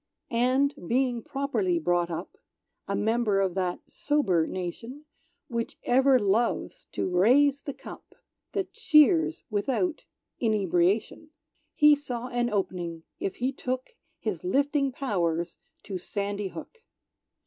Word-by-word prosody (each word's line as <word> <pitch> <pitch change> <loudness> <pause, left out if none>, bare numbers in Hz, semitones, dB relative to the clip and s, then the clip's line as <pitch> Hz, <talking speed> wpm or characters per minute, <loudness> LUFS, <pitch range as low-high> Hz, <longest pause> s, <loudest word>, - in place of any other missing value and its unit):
And, 255 +4 +2
being 245 -1 +1
properly 285 - -1
brought 175 - +1
up, 165 - -6 0.5
A 200 - -1
member 220 -2 +1
of 190 -2 +1
that 180 -1 -2
sober 190 - +1
nation, 230 - -6 0.4
Which 235 -3 -3
ever 265 +2 +5
loves 220 +2 0
to - - -1
raise 260 +10 +4
the 280 - -6
cup - - -12 0.4
That 390 -2 -2
cheers 290 - +4
without 270 - -1 0.3
inebriation, 205 - +1 0.5
He 300 0 +7
saw 250 -4 -5
an 240 -1 0
op'ning 175 -5 -3 0.2
if 195 - -3
he 255 +2 -1
took 255 - -4 0.3
His - - -4
lifting 285 -4 +1
pow'rs 175 - -1 0.3
to 190 -3 -5
Sandy 200 +2 -3
Hook. 460 - -10
235 Hz, 120 wpm, -27 LUFS, 190-280 Hz, 0.5 s, He